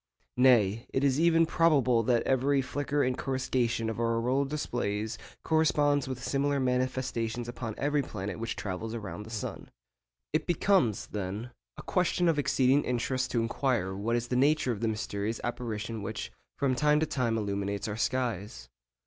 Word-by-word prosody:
Nay, 115 -3 +4
it 135 - 0
is 140 0 +3
even 165 0 +5
probable 140 -8 +3
that 120 +1 +2
every 135 +2 +2
flicker 145 +2 -1
and 125 0 +1
coruscation 125 -4 -1
of 110 +1 -3
our 115 0 +1
auroral 130 +4 +1
displays 115 -7 -2 0.2
corresponds 145 -3 +2
with 130 -1 -5
similar 140 0 0
manifestations 125 -2 -1
upon 115 -2 -5
every 145 +1 +1
planet 105 -5 -5
which 115 0 -3
travels 110 +4 -4
round 105 -1 -6
the - - -9
sun. 110 -3 -5 0.6
It 155 - 0
becomes, 175 - +2
then, 105 +4 -5 0.3
a - - -8
question 180 0 +1
of 160 -3 +2
exceeding 135 0 +3
interest 125 +1 -1
to 120 - +1
inquire 115 -4 0
what 110 +4 -1
is 120 0 -2
the 125 - 0
nature 140 0 +3
of 110 - -3
the 115 - +1
mysterious 110 0 -2
apparition 115 -2 -4
which 100 - -5 0.3
from 135 -2 +1
time 150 +3 +3
to 160 - +2
time 120 -6 0
illuminates 100 0 -2
our 105 - -3
skies. 105 - -2
125 Hz, 165 wpm, -29 LUFS, 110-140 Hz, 0.6 s, even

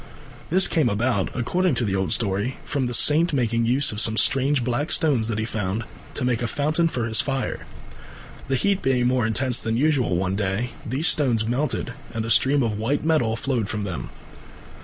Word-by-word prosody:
This 185 +3 +5
came 155 -8 +1
about, 105 -1 0
according 175 +6 0
to 120 - 0
the 95 -2 -1
old 95 -1 -1
story, 105 +3 0
from 135 -3 -2
the 120 - -4
saint 155 +6 +4
making 115 -3 0
use 130 +3 +3
of 105 0 -1
some 110 -1 +2
strange 135 +1 +2
black 125 +5 -2
stones 135 -9 +1
that 115 -2 -2
he 110 - -2
found, 105 -1 -3 0.3
to 130 - -2
make 125 -2 0
a 120 - -1
foundation 155 +6 0
for 125 -8 -3
his 110 -1 +3
fire. 135 -2 -4 0.8
The 135 - 0
heat 200 +7 +1
being 125 -2 +1
more 125 -2 +1
intense 125 +2 +1
than 115 0 -2
usual 135 - +1
one 95 +1 -1
day, 100 +4 -2
these 135 +8 -1
stones 120 -8 +2
melted 125 +6 -1 0.2
and 110 -1 -2
a 115 - -3
stream 135 +4 +4
of 105 -3 -2
white 135 +8 -1
metal 150 -9 +1
flowed 115 -3 -2
from 105 - -3
them. 85 -11 -5
120 Hz, 200 wpm, -23 LUFS, 110-140 Hz, 0.8 s, This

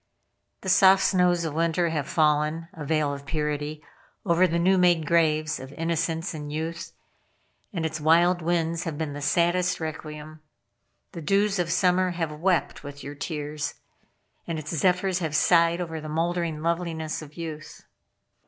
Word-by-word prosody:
The - - -4
soft 190 -1 +6
snows 180 -2 +2
of 155 - -3
winter 165 +1 +1
have 150 -3 -2
fallen 155 +1 +1
a 155 - -7
veil 150 -1 0
of 140 0 -9
purity 150 0 -3 0.4
over 180 0 +4
the 170 0 -1
new 185 +2 +3
made 175 -3 +3
graves 155 -1 +2
of 130 +1 -9
innocence 165 +1 -2
and 150 -2 -6
youth, 160 +2 -4 0.8
and 170 -6 -3
its 160 0 -3
wild 170 +3 +4
winds 170 0 0
have 160 -3 -4
been 155 -2 -3
the 145 - -6
saddest 175 +4 +1
requiem. 155 -1 -7 0.7
The 170 - -7
dews 200 +4 +1
of 170 -1 0
summer 185 +1 +3
have 165 -3 -1
wept 170 +2 0
with 145 -1 -9
your 145 - -6
tears, 150 0 -4 0.7
and 165 - -2
its 155 +2 -5
zephyrs 180 +2 +1
have 160 -4 -3
sighed 170 +1 +4
over 160 -3 -4
the 155 - -7
mouldering 165 0 -1
loveliness 165 -2 -2
of 150 -1 -12
youth. 155 -2 -7
165 Hz, 160 wpm, -26 LUFS, 155-175 Hz, 0.8 s, soft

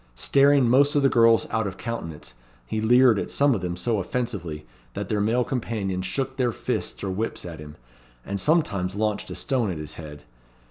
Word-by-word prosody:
Staring 140 - +4
most 140 +5 +4
of 145 - +3
the 135 - +5
girls 115 -2 +4
out 110 -2 0
of 95 -1 -6
countenance, 95 - -6 0.3
he 110 - -3
leered 120 -1 +5
at - - -4
some 140 -1 +3
of 105 - -2
them 90 -1 -3
so 110 +4 0
offensively, 90 -7 -4 0.3
that 100 -1 -4
their 105 -2 0
male 115 +4 +2
companions 100 -7 -3
shook 130 +7 -3
their 125 -2 +1
fists - - -4
or 95 - -2
whips 105 +1 -3
at 85 -3 -8
him, 75 0 -10 0.5
and 100 0 -3
sometimes 100 - +1
launched 105 0 -1
a - - -6
stone 125 -6 0
at 90 - -3
his 75 0 -6
head. 75 -2 -10
110 Hz, 195 wpm, -25 LUFS, 90-125 Hz, 0.5 s, the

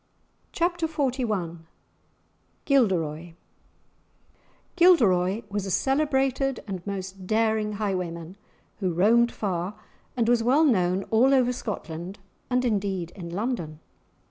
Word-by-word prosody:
*Chapter 345 -1 0
XLI* 245 - -2 1.1
*Gilderoy* 175 - +1 1.4
Gilderoy 225 - +4
was 200 -1 -3
a - - -3
celebrated 270 - +1
and 190 -4 -5
most 190 -1 -6
daring 220 0 +1
highwayman, 180 -4 -3 0.4
who 185 -4 -1
roamed 230 +7 +4
far, 185 -1 -3 0.4
and 230 -2 +1
was 240 -1 +3
well 260 +7 +3
known 185 -7 +2
all 255 +5 +5
over 250 -1 +3
Scotland 185 -6 -6 0.3
and 250 0 +1
indeed 195 -6 -1
in 175 -4 -8
London. 175 -5 -3
210 Hz, 105 wpm, -26 LUFS, 180-250 Hz, 1.4 s, all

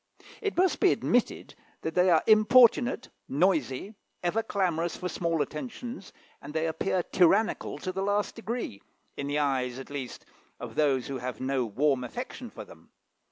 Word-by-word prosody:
It 405 -4 -2
must 370 +1 +3
be - - +5
admitted - - 0 0.3
that 160 - -2
they 180 +1 +4
are 165 -3 +4
importunate, 240 +3 +5 0.2
noisy, 155 - +1 0.3
ever 180 +6 +1
clamorous 175 -6 -1
for 180 - -3
small 165 -3 0
attentions, 235 - -7 0.3
and 150 +2 -9
they 160 0 +1
appear 175 +3 0
tyrannical 190 +6 +2
to 185 - -4
the 190 +1 -3
last 205 +1 0
degree, 230 - -5 0.3
in 140 - -4
the 145 +1 -1
eyes, 130 -4 0
at 135 +1 -9
least, 135 -4 -6 0.3
of - - -7
those 135 -5 +2
who 135 -2 -4
have 125 -3 -5
no 130 -1 0
warm 130 +4 +1
affection 245 - -6
for - - -9
them. - - -17
170 Hz, 160 wpm, -28 LUFS, 140-210 Hz, 0.3 s, be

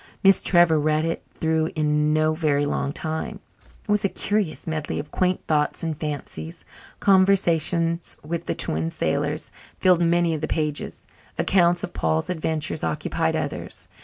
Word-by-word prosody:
Miss 195 0 +6
Trevor 175 -3 +4
read 155 +1 +1
it 165 - -2
through 160 0 0
in 150 -1 +2
no 155 0 +2
very 150 -3 +1
long 140 -1 -1
time. 160 +1 -4 0.5
It - - -1
was 210 0 +2
a 200 - +2
curious 205 -5 -1
medley 155 -2 -3
of 150 - -6
quaint 185 0 0
thoughts 150 0 0
and 160 -1 -1
fancies. 140 - -6 0.3
Conversations 175 -3 +2
with 170 +2 -4
the - - -1
Twin 80 +1 -1
Sailors - - -2 0.3
filled 180 -2 +4
many 170 0 +3
of 155 - -3
the 155 - -1
pages; 150 -2 -2 0.3
accounts 175 -2 +3
of - - -5
Paul's 80 - 0
"adventures" 160 -2 -2
occupied 80 -1 -1
others. - - -4
160 Hz, 155 wpm, -24 LUFS, 150-175 Hz, 0.5 s, Miss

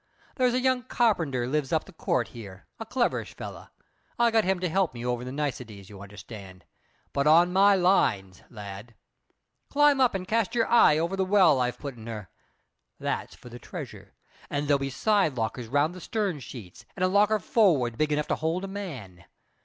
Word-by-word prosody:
There's 250 -2 +2
a - - +2
young 255 0 +1
carpenter 175 - 0
lives 140 0 -1
up - - +1
the - - -15
court - - -1
here 100 -5 -11
a 225 - -7
cleverish 245 0 -1
fellow. - - -9 0.5
I 235 -1 +3
got 225 -3 +3
him 190 -1 +1
to 180 - 0
help 180 -4 0
me 120 0 -6
over 125 0 -2
the 125 - -6
niceties, 125 -9 -5
you 100 -1 -11
understand; 100 -2 -11 0.5
but 140 +1 +1
on 170 +3 +5
my 200 +1 +5
lines, 115 - +1
lad. 105 +1 -9 0.7
Climb 290 -1 +4
up 250 -5 +3
and 185 -1 -4
cast 225 +1 0
your 230 - +2
eye 230 -10 +5
over 170 +4 -1
the 190 - 0
well 185 -7 +4
I've 125 -1 -1
put 140 -2 -7
in 110 0 -11
her. 105 -5 -7 0.7
That's - - -3
for 125 - -14
the 120 +1 -10
treasure; - - -9 0.3
and 145 0 -2
there'll 140 -1 +3
be 135 0 -3
side 190 - +1
lockers 115 +1 -3
round 145 +7 +1
the 185 - -10
stern 200 -8 -2
sheets, 110 -6 -11
and 185 - -1
a - - +3
locker 205 +3 +3
forward 160 - +2
big 155 +4 0
enough 150 0 -1
to - - +2
hold 165 +4 -2
a - - -4
man. 135 - -8
150 Hz, 195 wpm, -27 LUFS, 120-200 Hz, 0.7 s, on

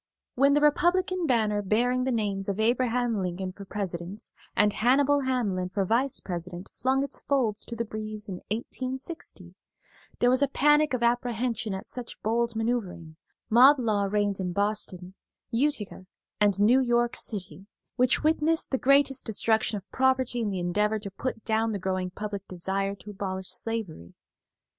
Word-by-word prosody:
When 280 +2 +4
the 295 - +3
Republican 350 +4 +2
banner 215 -5 +2
bearing 245 +5 +1
the 260 - 0
names 205 -4 -1
of 200 +1 -2
Abraham 240 -1 +1
Lincoln 185 +1 -3
for 200 +1 -11
President 190 -1 -5 0.2
and 210 0 +3
Hannibal 280 +5 +3
Hamlin 225 -9 -1
for 195 +1 -1
Vice 245 +7 +1
President 175 0 -6
flung 265 +1 +1
its 280 - -3
folds 240 -7 0
to 235 - -4
the 230 0 -2
breeze 215 -1 -6
in 190 -3 -5
1860, 260 - -5 0.6
there 245 - +3
was 260 +2 +3
a 280 - +4
panic 295 +1 +3
of 240 - -2
apprehension 235 -3 0
at 190 - -7
such 250 -2 -6
bold 230 +1 0
manoeuvering; 215 -9 -3 0.3
mob 260 +6 +7
law 215 -5 +1
reigned 205 0 0
in 180 -2 -2
Boston, 200 -2 -1 0.4
Utica 230 -7 -1 0.3
and 205 -2 +3
New 230 +6 +5
York 240 -2 +1
City, 195 -2 -2 0.3
which 255 +3 +2
witnessed 315 +1 +2
the 265 - 0
greatest 275 0 +3
destruction 220 0 0
of 195 - -10
property 260 -2 +1
in 215 - -1
the 195 - -3
endeavor 210 +5 0
to 200 -2 -7
put 225 +2 -5
down 220 0 +1
the - - -1
growing 185 -1 -2
public 200 +1 -6
desire 195 +2 -2
to 200 +2 -11
abolish 190 -2 -5
slavery. 200 - -4
220 Hz, 160 wpm, -27 LUFS, 195-255 Hz, 0.6 s, mob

